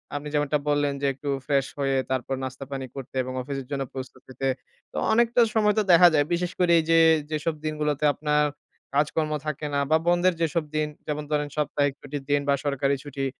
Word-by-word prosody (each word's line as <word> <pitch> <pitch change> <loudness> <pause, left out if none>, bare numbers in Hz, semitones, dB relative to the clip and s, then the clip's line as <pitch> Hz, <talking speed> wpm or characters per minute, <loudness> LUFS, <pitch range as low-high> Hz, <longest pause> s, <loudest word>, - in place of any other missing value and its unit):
আপনি 145 +1 -4
যেমনটা 150 0 +1
বললেন 145 -1 +1
যে, - - 0
একটু 140 +2 -6 0.2
ফ্রেশ 140 -2 +2
হয়ে 135 -1 +1 0.2
তারপর 130 +1 -1
নাস্তা 130 +1 -6
পানি 135 -1 -4
করতে 135 -1 -8
এবং 130 - -6
অফিসের 135 0 -5
জন্য 140 -1 -1
প্রস্তুত 130 0 -8
হতে। 130 +1 -3 0.4
তো - - -8 0.2
অনেকটা 235 +1 +4
সময় 210 -1 +4
তো - - +2
দেখা 175 +1 +8
যায় 145 -1 +3
বিশেষ 175 +1 -1
করে 175 -1 +3
এই - - 0
যে, 165 0 +6 0.3
যেসব 155 +1 -1
দিনগুলোতে 150 -1 -1
আপনার 150 +1 +1 0.5
কাজকর্ম 155 +1 +1
থাকে 150 0 -3
না 140 - +2
বা 160 - +6
বন্ধ 175 0 +3 0.2
যেসব 165 0 +1
দিন। 155 0 +1 0.2
যেমন 150 0 -2
ধরেন 150 -1 +1
সাপ্তাহিক 145 -2 0
ছুটির 145 -1 -6
দিন 145 - +4
বা - - +5
সরকারি 140 0 +1
ছুটি, 140 -2 -4
145 Hz, 195 wpm, -25 LUFS, 135-155 Hz, 0.5 s, দেখা